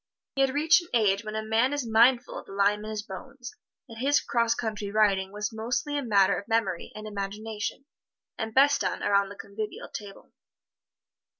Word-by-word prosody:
He 270 - 0
had 270 - +4
reached 320 +4 +5
an 345 - -14
age 205 -2 +3
when 215 0 -6
a 220 - -2
man 225 +5 +2
is 285 -3 -2
mindful 235 +3 +4
of - - -14
the - - -10
lime 200 +1 +2
in 215 - -6
his 215 -1 -4
bones, 205 +5 -9 0.3
and 225 -2 -11
his 285 +3 +3
'cross 230 -1 +1
country 215 -3 -3
riding 200 -2 +2
was 210 +2 -4
mostly 240 +6 -2
a 290 - 0
matter 200 -6 +3
of 200 - -12
memory 200 -6 -1
and 215 0 -8
imagination, 210 +4 -5 0.5
and 220 0 -4
best 280 +4 +4
done - - -2
around 200 -1 +2
the 205 - -9
convivial 205 +2 -6
table. 200 -2 -9
220 Hz, 190 wpm, -27 LUFS, 205-240 Hz, 0.5 s, reached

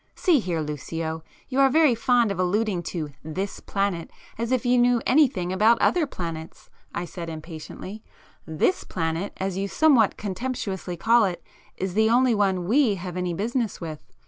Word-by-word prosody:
"See 345 -6 +3
here, 175 -7 -2
Lucio, 160 +2 -4 0.2
you 265 0 -1
are 270 0 +6
very 305 -1 +5
fond 235 -1 +2
of 190 - -4
alluding 190 +1 +1
to 155 -5 -4
'this' 185 +6 -4
planet 195 -4 -2 0.3
as 230 +2 -3
if 255 -1 +1
you 245 0 +4
knew 245 0 +4
anything 240 - +3
about 220 +5 +4
other 340 -4 +2
planets"—I 165 -2 -7
said 170 0 -7
impatiently. 165 +6 -8 0.5
"This 160 - +1
planet, 165 +3 -2
as 190 -1 -2
you 195 +1 -1
somewhat 255 -3 +4
contemptuously 195 -4 -4
call 230 +4 +4
it, 180 -3 -4 0.3
is 190 -1 -3
the 220 +2 +3
only 245 +1 +4
one 190 -4 +1
we 240 -1 +3
have 180 -1 -6
any 180 -1 -2
business 230 +3 -2
with." 155 -3 -7
195 Hz, 165 wpm, -25 LUFS, 175-240 Hz, 0.5 s, are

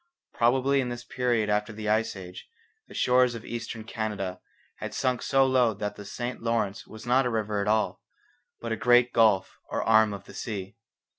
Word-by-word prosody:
Probably 130 +3 +3
in 125 - -3
this 120 0 -6
period 120 -4 0
after 105 +1 0
the 105 0 -6
Ice 110 +1 +1
Age 90 -2 -10 0.4
the - - -13
shores 125 -1 +3
of 115 - -8
Eastern 115 -1 -5
Canada 105 -5 -4 0.4
had - - -6
sunk 125 -2 0
so 135 -1 +3
low 125 -4 +3
that 105 0 -4
the 105 - -10
St 120 +4 -5
Lawrence 115 -3 -1
was 110 +1 -11
not 125 +1 +3
a - - 0
river 110 -3 -1
at 100 - -2
all, 110 0 +1 0.6
but 115 - -5
a - - +1
great 120 +2 +4
gulf 110 -4 +3
or - - -1
arm 110 -1 +5
of 100 -2 -7
the - - -14
sea. 95 -4 -5
115 Hz, 195 wpm, -27 LUFS, 105-125 Hz, 0.6 s, arm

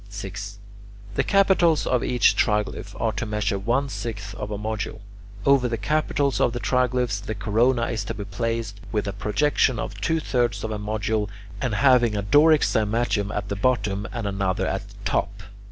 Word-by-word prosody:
6. 100 0 -7 0.6
The - - +1
capitals 190 -5 +3
of 125 -2 +1
each 120 -4 +3
triglyph 105 0 -1
are 115 - +1
to 110 +2 -3
measure 105 -2 -1
one 120 +8 0
sixth 105 -6 -5
of 105 - -5
a 105 - -3
module. 110 0 -4 0.4
Over 135 -3 +4
the 115 -1 -2
capitals 145 0 0
of 120 - +2
the 120 - -3
triglyphs 125 -4 0
the 110 0 -4
corona 115 +4 +2
is 115 - -2
to 115 - -4
be 100 - -5
placed, 110 0 -3
with 105 -2 -1
a 100 - -2
projection 125 +4 +1
of - - -5
two 160 0 +1
thirds 120 -5 0
of 110 - -3
a 105 - -3
module, 105 0 -1 0.3
and 125 -5 0
having 120 -4 +4
a 100 - -1
Doric 150 +8 +5
cymatium 110 -1 +1
at 105 - -4
the 100 - -2
bottom 105 -2 0
and 115 -3 -4
another 95 -1 -1
at 95 +2 -3
the 100 - -16
top. 100 +2 -1
110 Hz, 185 wpm, -24 LUFS, 100-125 Hz, 0.6 s, Doric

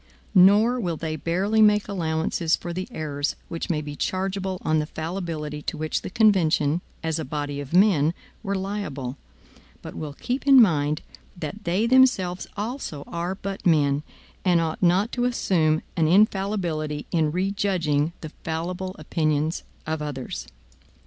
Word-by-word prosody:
Nor 210 +7 +6
will 175 -7 -2
they 155 0 -3
barely 190 +8 +1
make 210 -1 +5
allowances 165 -3 0
for 175 - -6
the 185 +2 -4
errors 145 -2 -3
which 165 - -4
may 155 -3 0
be 145 -1 -7
chargeable 190 +2 -2
on 155 0 +2
the 150 - -2
fallibility 160 -3 -4
to - - -4
which 155 0 -2
the - - -6
convention, 175 -7 +3 0.2
as 160 0 -1
a - - -2
body 145 0 -4
of 140 -2 -7
men, 175 -4 +4 0.3
were 200 -2 -2
liable; 190 -10 -4 0.7
but - - -7
will 150 -2 -6
keep 255 - -3
in 270 -1 +9
mind, 155 -8 +3 0.3
that 175 +6 -6
they 185 +6 +1
themselves 230 -8 +3
also 210 - -4
are 175 +2 -3
but 195 0 -6
men, 145 -4 +3 0.4
and 180 -3 +4
ought 160 -1 -2
not 185 +5 +3
to 245 -1 0
assume 160 -10 +1
an 160 -3 +2
infallibility 180 -6 +1
in 160 -3 +2
rejudging 180 -5 0
the 155 - -6
fallible 180 +3 -3
opinions 155 0 0 0.2
of 155 0 -2
others. 140 - -5
170 Hz, 150 wpm, -24 LUFS, 155-195 Hz, 0.7 s, in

